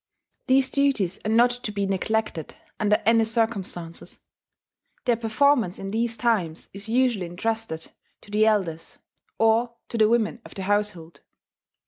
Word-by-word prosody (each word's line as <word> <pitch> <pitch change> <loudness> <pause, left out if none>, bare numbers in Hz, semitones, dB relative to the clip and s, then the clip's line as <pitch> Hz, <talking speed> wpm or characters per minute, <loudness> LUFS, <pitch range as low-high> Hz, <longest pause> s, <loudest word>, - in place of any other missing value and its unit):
These 260 0 +3
duties 265 -10 +1
are - - 0
not 235 +2 +5
to 245 -3 -5
be 200 -1 -1
neglected 195 -3 -2 0.2
under 210 0 +3
any 225 +1 +5
circumstances; 215 -7 -2 0.9
their 245 -2 +3
performance 230 -2 +2
in 195 0 -6
these 230 +1 -1
times 205 -9 -1
is 200 +3 -6
usually 235 -6 +1
intrusted 205 -2 -4 0.3
to 205 - -15
the 215 +1 +3
elders, 175 -7 -1 0.4
or 230 +2 +2
to 230 - -3
the 215 -1 +5
women 235 +1 +1
of - - -13
the 195 - -5
household. 200 -5 -1
220 Hz, 140 wpm, -25 LUFS, 195-235 Hz, 0.9 s, not